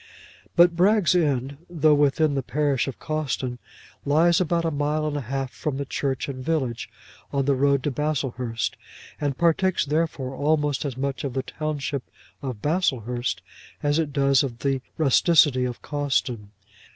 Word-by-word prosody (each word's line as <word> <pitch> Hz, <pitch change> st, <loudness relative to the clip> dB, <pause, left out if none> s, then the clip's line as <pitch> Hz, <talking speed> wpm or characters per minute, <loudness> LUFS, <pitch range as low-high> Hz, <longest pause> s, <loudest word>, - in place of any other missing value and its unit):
But 175 Hz, 0 st, +6 dB
Bragg's 190 Hz, +1 st, +4 dB
End, 140 Hz, -5 st, 0 dB
though 155 Hz, -3 st, +3 dB
within 145 Hz, +1 st, +3 dB
the 135 Hz, -, 0 dB
parish 140 Hz, 0 st, 0 dB
of 135 Hz, -, -5 dB
Cawston, 135 Hz, -5 st, -3 dB, 0.4 s
lies 165 Hz, +5 st, +3 dB
about 170 Hz, -1 st, 0 dB
a 165 Hz, -, +1 dB
mile 150 Hz, +1 st, 0 dB
and 150 Hz, -1 st, -2 dB
a 145 Hz, -, -1 dB
half 135 Hz, +1 st, -3 dB
from 145 Hz, -1 st, -3 dB
the 140 Hz, -, -3 dB
church 135 Hz, -1 st, -2 dB
and 130 Hz, -2 st, -6 dB
village, 130 Hz, -7 st, -1 dB, 0.4 s
on 140 Hz, -1 st, 0 dB
the 140 Hz, -, +3 dB
road 140 Hz, 0 st, +2 dB
to 145 Hz, -, 0 dB
Baslehurst, 130 Hz, -5 st, -2 dB, 0.4 s
and 140 Hz, -3 st, -1 dB
partakes 170 Hz, +1 st, +2 dB
therefore 150 Hz, -3 st, -1 dB
almost 145 Hz, 0 st, 0 dB
as 135 Hz, -3 st, -4 dB
much 140 Hz, 0 st, -2 dB
of 135 Hz, -3 st, -3 dB
the 130 Hz, -, 0 dB
township 145 Hz, -2 st, -3 dB, 0.4 s
of 125 Hz, -6 st, -6 dB
Baslehurst 125 Hz, -, -1 dB, 0.4 s
as 145 Hz, +2 st, +2 dB
it 155 Hz, -3 st, -1 dB
does 140 Hz, -1 st, +3 dB
of 125 Hz, -4 st, -3 dB
the 135 Hz, -1 st, +1 dB, 0.2 s
rusticity 145 Hz, -3 st, +4 dB
of 125 Hz, -1 st, -5 dB
Cawston. 130 Hz, -7 st, -1 dB
140 Hz, 160 wpm, -24 LUFS, 130-155 Hz, 0.4 s, But